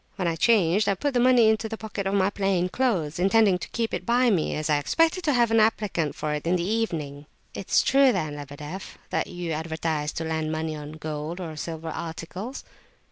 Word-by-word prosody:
When 185 -4 -1
I 165 - 0
changed, 200 +1 +3
I 200 - +2
put 285 +9 -2
the 245 - +2
money 245 -2 +5
into 220 0 +1
the 225 - -5
pocket 210 -3 -4
of 195 - 0
my 195 0 +2
plain 195 -3 0
clothes, 180 - 0
intending 195 0 +4
to - - -7
keep 230 -1 -2
it - - -2
by 245 0 +3
me, 175 -6 0
as 155 0 -2
I 150 -2 +3
expected 330 - +1
to 295 - +3
have 235 -2 +3
an 225 - +4
applicant 210 -8 +1
for 150 -1 -2
it 150 +2 -4
in 180 - +3
the 175 - 0
evening." 155 -10 -2 0.3
"It's 190 - +1
true 270 0 +5
then, 155 -8 -2
Lebedeff, 145 +5 -8
that - - 0
you 175 -2 -5
advertise 160 -1 -2
to 165 - -3
lend 160 -1 -2
money 160 0 -2
on 150 0 -8
gold 155 +2 -5
or 165 -4 -6
silver 160 +1 -5
articles?" 170 - -6
180 Hz, 215 wpm, -25 LUFS, 155-220 Hz, 0.3 s, money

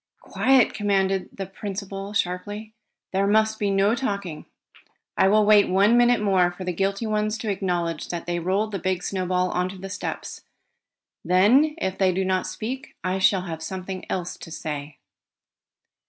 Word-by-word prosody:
"Quiet!" 260 -2 +3
commanded 195 -2 0
the 195 - -6
principal 195 0 -6
sharply. 205 +3 -3 0.4
"There 195 +1 +2
must 220 +1 +2
be 205 - +1
no 195 +2 +3
talking. 200 -9 -3 0.7
I - - +4
will 210 +2 +4
wait 210 -1 +6
one 200 +5 +4
minute 240 0 +4
more 190 -4 +3
for 180 +1 -8
the 180 -1 -2
guilty 195 +5 -1
ones 215 0 0
to 220 -2 -2
acknowledge 175 -4 -2
that 170 -1 -4
they 175 0 -1
rolled 195 +5 0
the 195 - -3
big 185 0 -1
snowball 185 -1 0
on 180 +1 0
the 195 +1 -7
steps. - - -5 0.8
Then, 220 - +4
if 190 - -3
they 190 -1 +4
do 190 +1 -1
not 185 0 0
speak, 245 +8 -6
I 185 +1 -1
shall 190 -1 +3
have 165 -3 -6
something 185 +2 -5
else 180 -1 -3
to - - -10
say." 150 -2 -6
195 Hz, 165 wpm, -24 LUFS, 180-210 Hz, 0.8 s, wait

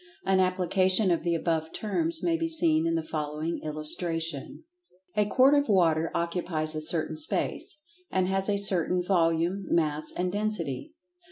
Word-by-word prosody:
An 190 0 +2
application 185 +1 +2
of 170 - +1
the 170 0 0
above 160 -1 -1
terms 325 +10 -1
may 335 -1 +2
be 330 0 -2
seen 165 - +3
in 165 - 0
the 165 - -1
following 155 +1 -4
illustration: 155 - -3 0.5
A 210 -1 +2
quart 260 +6 +4
of 285 -3 +2
water 165 -5 +3
occupies 170 -2 -1
a 155 - -3
certain 155 0 0
space—and 300 - -2
has 195 +1 +1
a 200 - +1
certain 180 -2 +1
"volume," 175 +1 +1
"mass" 155 -2 0
and 180 0 -2
"density." 210 - -3
175 Hz, 150 wpm, -27 LUFS, 160-200 Hz, 0.5 s, quart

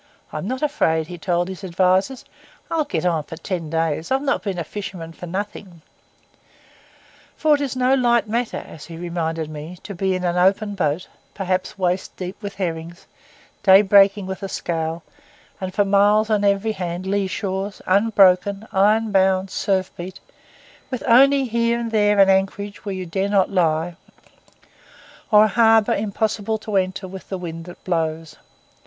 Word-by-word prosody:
'I'm 155 +4 -4
not 260 +4 -3
afraid,' 160 - +1
he 180 - -10
had 175 - -10
told 175 0 0
his 190 +1 -8
adviser; 185 +7 +1 0.5
'I'll 320 -2 +1
get 285 - -2
on 165 -3 +1
for 160 - -9
ten 170 -2 -4
days. 160 0 -1
I've 265 +1 +1
not 280 - 0
been 195 -3 -3
a 170 - -2
fisherman 170 -2 -7
for 175 - -9
nothing.' 185 -2 -6 1.5
For 310 -1 +3
it 290 - +2
is 270 -3 -2
no 255 +1 +2
light 240 -4 +3
matter, 235 +2 -1
as 155 - -11
he 165 -1 -9
reminded 165 -2 -3
me, 155 +3 -8
to 200 - -7
be 190 +1 0
in 185 - -3
an 175 0 0
open 195 +3 +2
boat, 180 -3 -1 0.3
perhaps 185 -1 -2
waist 185 0 -1
deep 185 +2 -6
with 205 -2 -6
herrings, 170 -2 -5 0.6
day 195 0 +7
breaking 200 0 +5
with 190 0 -6
a 195 - -4
scowl, 165 -1 -3 0.6
and 185 -1 -4
for 205 +1 +1
miles 205 +2 +3
on 210 -1 +2
every 200 +2 +2
hand 180 -2 -4
lee 195 0 0
shores, 195 +1 -4
unbroken, 200 0 +3
iron 210 +3 +3
bound, 190 -1 +2
surf 190 -2 0
beat, 180 +2 -7 0.7
with 255 -3 -4
only 275 +3 +5
here 235 0 0
and 230 -1 -4
there 210 -1 +3
an 195 -1 +7
anchorage 195 +1 0
where 200 -2 -3
you 185 -1 -5
dare 190 +4 -2
not 200 -2 +2
lie, 165 -2 +1 1.3
or 210 -1 +7
a - - +4
harbour 225 0 +4
impossible 215 +1 -1
to 215 -1 -6
enter 190 0 -1
with 190 0 -10
the 190 - -3
wind 165 -2 -7
that 175 - -12
blows. 160 -3 -2
190 Hz, 175 wpm, -21 LUFS, 175-210 Hz, 1.5 s, day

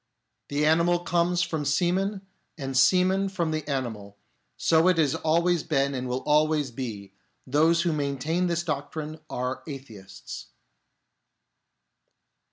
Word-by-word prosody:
The 145 +1 0
animal 170 +3 +4
comes 175 0 +1
from 160 -3 -2
semen 185 +7 0 0.4
and 135 -3 -4
semen 185 +8 +4
from 175 -5 -1
the 155 -2 -3
animal; 110 -7 -4 0.4
so 165 +1 +3
it 185 -2 +4
has 150 -4 +3
always 170 +2 +2
been 140 -3 0
and 130 -1 -3
will 125 +1 -2
always 150 -2 +2
be; 110 -6 -6 0.3
those 160 +5 +3
who 170 -3 +1
maintain 150 +4 -1
this 170 0 0
doctrine 155 0 -4
are 125 +1 -3
atheists. 125 -9 -9
155 Hz, 125 wpm, -26 LUFS, 135-170 Hz, 0.4 s, animal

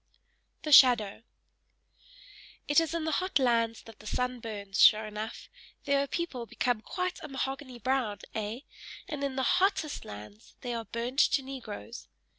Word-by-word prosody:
THE 305 - -3
SHADOW 240 -7 +7 1.5
It 290 +2 +5
is 330 0 -1
in 330 -2 -2
the 315 - 0
hot 370 +1 +1
lands 230 -3 +1
that 225 - -14
the 215 - -12
sun 250 +2 -1
burns, 205 -3 -3
sure 215 0 +7
enough! 215 +1 -6 0.4
there 280 0 +2
the 280 - -2
people 265 -8 -4
become 245 -2 -1
quite 365 - -3
a - - -7
mahogany 270 -1 -4
brown, 245 -4 0 0.2
ay, 220 +4 -4 0.4
and 295 -2 -4
in 275 -2 -2
the 265 - 0
HOTTEST 360 -2 +1
lands 105 +1 -11
they 245 -1 -3
are 230 -1 -4
burnt 235 +5 -3
to 275 - +4
Negroes. 240 -4 -8
250 Hz, 160 wpm, -30 LUFS, 220-280 Hz, 1.5 s, SHADOW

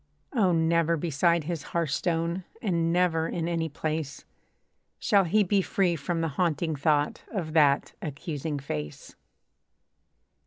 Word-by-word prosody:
Oh! 205 -8 +3
never 165 0 +2
beside 170 +1 +1
his 165 0 -3 0.2
hearthstone, 170 +3 0 0.2
And 170 -7 0
never 170 -2 +2
in 165 -1 -2
any 165 -1 -1
place, 155 -1 -4 0.7
Shall 200 -2 +3
he 210 +5 +3
be 195 +1 +2
free 185 -2 +1
from 165 +3 -2
the 165 - +1
haunting 165 -2 +1
thought 145 +1 +1
Of 170 -8 -3
that 145 -3 +3
accusing 150 -2 -4
face. 75 - -6
165 Hz, 125 wpm, -27 LUFS, 155-175 Hz, 0.7 s, Oh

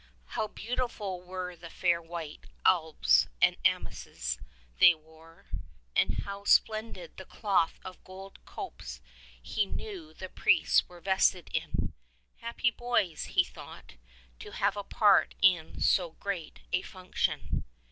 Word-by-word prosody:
How 215 - 0
beautiful 215 -5 -3
were 180 0 -5
the 170 0 -11
fair 170 0 +1
white 165 -2 -7 0.2
albs 155 - +4
and - - +5
amices - - -1 0.4
tliey 160 -2 +8
wore, 160 +1 -19 0.5
and - - +2
how 200 0 -6
splendid 220 - +2
the - - -8
cloth 195 -6 +1
of 185 -1 -9
gold 190 +1 -11
copes 60 +1 -8 0.4
he 200 - -1
knew 185 -9 -6
the 185 - -7
priests - - +3
were 175 -1 -13
vested 190 -2 +2
in! - - -2 0.4
Happy 235 +1 0
boys, 235 -9 0
he - - +3
thought, - - -12 0.5
to - - -10
have 200 +1 +1
a 205 - -4
part 205 0 +4
in 175 -4 +3
so 175 -4 +3
great 185 -5 -5
a 180 - +3
function. 185 -1 -2
185 Hz, 130 wpm, -30 LUFS, 165-200 Hz, 0.5 s, tliey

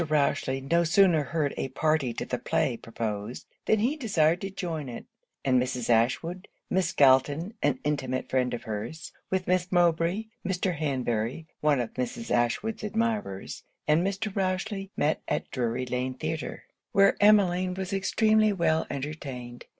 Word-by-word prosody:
Rochely 145 -3 +1
no 170 +6 +2
sooner 170 -3 +4
heard 150 -3 -1
a - - -1
party 155 -1 +1
to - - -3
the - - -3
play - - 0
proposed, 110 -1 -5 0.2
than 220 - +4
he 240 +8 +1
desired 175 - +2
to 195 - -3
join 165 -7 -4
it; 120 - -7 0.4
and 130 -2 +4
Mrs. 125 -1 -1
Ashwood, 145 +11 +1 0.2
Miss 190 0 +2
Galton, 145 - +4
(an 140 -3 +2
intimate 130 -3 -1
friend 130 -1 +1
of 120 - -8
her's), 115 +9 -5 0.2
with 190 -1 0
Miss 180 0 +1
Mowbray, 175 +3 +2 0.2
Mr. 185 -1 -1
Hanbury, 130 -2 -1
(one 150 -3 +3
of 120 -2 -3
Mrs. 230 - -4
Ashwood's 210 - 0
admirers), 215 - -2 0.3
and 150 +2 +4
Mr. 195 +2 -2
Rochely, 195 +1 -2
met 150 +2 +1
at - - -2
Drury 125 0 -1
Lane 125 +1 -2
Theatre; 155 +3 -4 0.3
where 195 0 +5
Emmeline 185 -3 +4
was 190 0 -4
extremely 215 +2 +3
well 170 -4 +1
entertained. 130 -4 -6
155 Hz, 150 wpm, -28 LUFS, 130-190 Hz, 0.4 s, where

